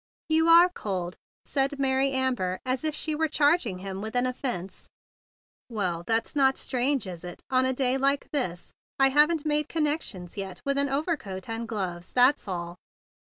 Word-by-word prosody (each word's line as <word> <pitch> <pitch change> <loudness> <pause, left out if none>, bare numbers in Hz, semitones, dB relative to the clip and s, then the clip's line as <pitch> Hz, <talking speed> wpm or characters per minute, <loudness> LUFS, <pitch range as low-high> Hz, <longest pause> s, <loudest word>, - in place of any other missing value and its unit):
"You 320 +1 +3
are 335 +2 +8
cold!" 190 - -4 0.3
said 275 -1 +1
Maiy 270 0 +2
Amber 250 -9 0
as 255 +2 -1
if 310 -1 0
she 310 - -2
were 320 +1 +1
charging 290 - +2
him 190 +1 -6
with 220 +3 -6
an 245 0 +3
offence. 245 -8 -4 0.8
"Well, 180 -7 -2
that's 225 +5 0
not 270 -2 +3
strange 260 -1 0
1 185 - -5
—is 170 -1 -11
it— 175 -1 -9
on 260 0 +3
a 260 - +1
day 260 0 +1
like 275 +1 +1
this? 180 - -3 0.2
I 270 0 +5
haven't 300 +3 +3
made 300 0 +1
connections 290 - -2
yet 190 -2 -5
with 280 0 +1
an 280 0 +1
overcoat 270 - -3
and 230 0 -4
gloves; 185 -6 -5
that's 255 0 +4
all." 175 -2 -5
255 Hz, 175 wpm, -27 LUFS, 190-290 Hz, 0.8 s, are